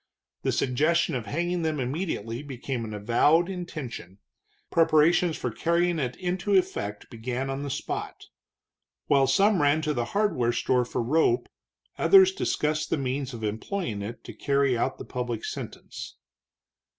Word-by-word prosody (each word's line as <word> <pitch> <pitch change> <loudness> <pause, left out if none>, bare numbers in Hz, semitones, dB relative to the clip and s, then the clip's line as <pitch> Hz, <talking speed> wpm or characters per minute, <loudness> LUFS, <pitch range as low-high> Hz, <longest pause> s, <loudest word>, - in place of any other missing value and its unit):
The - - 0
suggestion 155 +6 +1
of 120 -4 -3
hanging 175 +3 -1
them 155 -2 -1
immediately 130 - -3
became 130 -3 -4
an 110 - -6
avowed 120 +11 +3
intention; 145 - -7 0.5
preparations 165 +1 +4
for 125 - -3
carrying 170 +5 +1
it 125 -3 -2
into 185 +2 -1
effect 105 - -1
began 125 +3 -3
on 135 +1 -3
the 145 - -4
spot. - - -4 0.8
While 140 -2 +4
some 195 +7 +4
ran 145 +2 +3
to 155 -1 0
the 120 -3 -1
hardware 125 - +2
store 125 +1 +1
for 120 - -2
rope, 160 - +2 0.5
others 380 -1 +7
discussed 155 - -1
the - - +1
means 135 0 -2
of 110 - -8
employing 110 - -3
it 115 +4 -7
to - - -9
carry 140 -2 +1
out 130 +3 -1
the - - -8
public 120 -3 -4
sentence. - - -7
140 Hz, 150 wpm, -27 LUFS, 120-170 Hz, 0.8 s, others